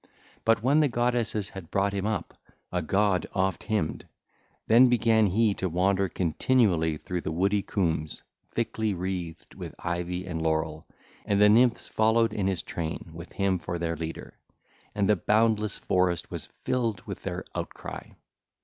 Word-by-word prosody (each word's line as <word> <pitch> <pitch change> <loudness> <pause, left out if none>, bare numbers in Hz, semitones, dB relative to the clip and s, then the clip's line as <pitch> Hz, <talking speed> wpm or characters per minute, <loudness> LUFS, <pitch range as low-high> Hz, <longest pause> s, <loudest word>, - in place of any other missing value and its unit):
But 115 -1 +3
when 140 +5 +4
the 150 - +4
goddesses 120 -4 0
had 95 -4 -9
brought 100 +1 +1
him 100 +1 -1
up, 110 -6 -2 0.4
a 90 - 0
god 95 +2 +1
oft 95 -2 0
hymned, 105 -8 -2 0.6
then 125 +3 +6
began 115 -3 +4
he 105 +3 +2
to 95 -1 -2
wander 95 +3 +1
continually 85 -2 +2
through 90 +3 -4
the 80 - -3
woody 100 +5 +1
coombes, 80 -6 -1 0.3
thickly 110 -3 -1
wreathed 90 -2 -5
with - - -8
ivy 90 +1 -3
and 80 -3 -4
laurel. 80 -1 -1 0.4
And 100 -1 +1
the 105 0 +7
Nymphs 115 +2 +4
followed 110 +1 +2
in 95 -2 0
his 95 -4 -1
train 80 0 -5
with 85 +2 -9
him 95 -2 +1
for 85 +2 -4
their 85 -1 -2
leader; 80 +1 -7 0.6
and 100 -1 +2
the 105 - +5
boundless 105 +2 +2
forest 90 -2 0
was - - -6
filled 115 -7 -2
with - - -7
their - - -4
outcry. - - -6
95 Hz, 160 wpm, -27 LUFS, 85-110 Hz, 0.6 s, the